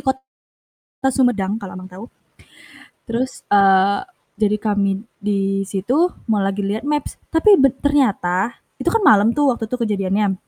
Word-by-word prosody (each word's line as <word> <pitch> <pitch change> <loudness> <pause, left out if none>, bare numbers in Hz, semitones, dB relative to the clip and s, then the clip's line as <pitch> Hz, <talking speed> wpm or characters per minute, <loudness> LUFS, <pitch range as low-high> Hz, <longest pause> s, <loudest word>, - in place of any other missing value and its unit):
kota 265 0 -4 0.8
Sumedang 220 -5 0
kalau 195 -3 -8
Abang 185 0 -10
tahu, 185 +4 -10 1.0
terus 245 +3 -3
eee, 195 0 +4 0.3
jadi 210 0 +1
kami 200 -1 -1 0.2
di 195 -1 0
situ, 250 - 0 0.2
mau 210 -3 +1
lagi 195 +1 -1
liat 215 +4 -2
maps, 295 -1 -2 0.2
tapi 365 +6 +5
be 270 -1 +4
ternyata 235 -7 0 0.2
itu - - +1
kan 455 - +1
malem 210 +1 +6
tuh 285 -4 +3
waktu 225 - -5
tuh 250 - -3
kejadiannya. 200 -1 0
210 Hz, 145 wpm, -19 LUFS, 195-260 Hz, 1.0 s, malem